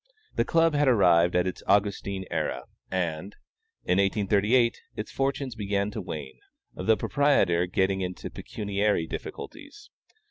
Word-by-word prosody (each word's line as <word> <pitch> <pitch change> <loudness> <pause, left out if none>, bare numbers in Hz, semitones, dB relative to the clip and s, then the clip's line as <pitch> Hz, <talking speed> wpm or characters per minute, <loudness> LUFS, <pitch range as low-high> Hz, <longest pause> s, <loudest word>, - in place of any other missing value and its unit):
The - - +1
Club 165 -1 +3
had 145 -1 +2
arrived 90 -7 +4
at 90 0 +3
its 95 - -4
Augustine 100 -1 +1
era, 65 -1 -2 0.3
and, 90 +1 -3 0.5
in 90 - +2
1838, 105 +4 +2
its 105 - -5
fortunes 135 -1 -1
began 100 -2 -1
to 110 - -5
wane; 75 -7 -7 0.3
the 110 +4 +2
proprietor 95 -12 +2
getting 95 +1 +1
into 90 -1 -5
pecuniary 100 -3 -1
difficulties. 315 - -9
100 Hz, 130 wpm, -27 LUFS, 90-120 Hz, 0.5 s, arrived